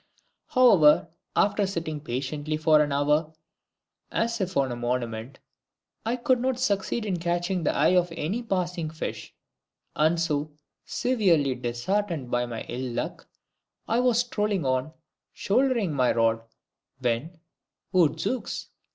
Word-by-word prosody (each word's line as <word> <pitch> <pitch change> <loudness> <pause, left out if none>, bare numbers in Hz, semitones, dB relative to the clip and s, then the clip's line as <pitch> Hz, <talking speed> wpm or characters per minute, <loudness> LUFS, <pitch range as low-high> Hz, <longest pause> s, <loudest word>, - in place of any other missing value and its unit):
However, 185 - +5 0.3
after 205 -1 +2
sitting 165 -5 -3
patiently 145 +4 -3
for 155 -1 +4
an 145 -1 0
hour, 150 +3 +1 0.8
as 230 -1 -1
if 185 -3 -2
on 135 -2 +2
a - - -3
monument, 120 0 -3 0.7
I 230 +2 0
could 255 0 +2
not 255 0 -1
succeed 210 -1 0
in 185 -4 -1
catching 175 +2 -1
the 155 - 0
eye 155 +5 +4
of 175 -1 +2
any 190 +11 -2
passing 180 -6 -2
fish, 160 0 -6 0.6
and 160 +2 +2
so, 150 -2 -1 0.3
severely 180 - +2
disheartened 130 +5 -2
by 120 0 +1
my 115 -2 -5
ill 125 0 -5
luck, 120 - -4 0.6
I 230 - +2
was 245 -1 +3
strolling 210 - -1
on, 130 +3 0 0.4
shouldering 235 - +1
my 130 -3 +2
rod, 115 -1 +2 0.6
when 130 +7 -2 0.6
odzooks! 175 - 0
160 Hz, 130 wpm, -26 LUFS, 135-205 Hz, 0.8 s, However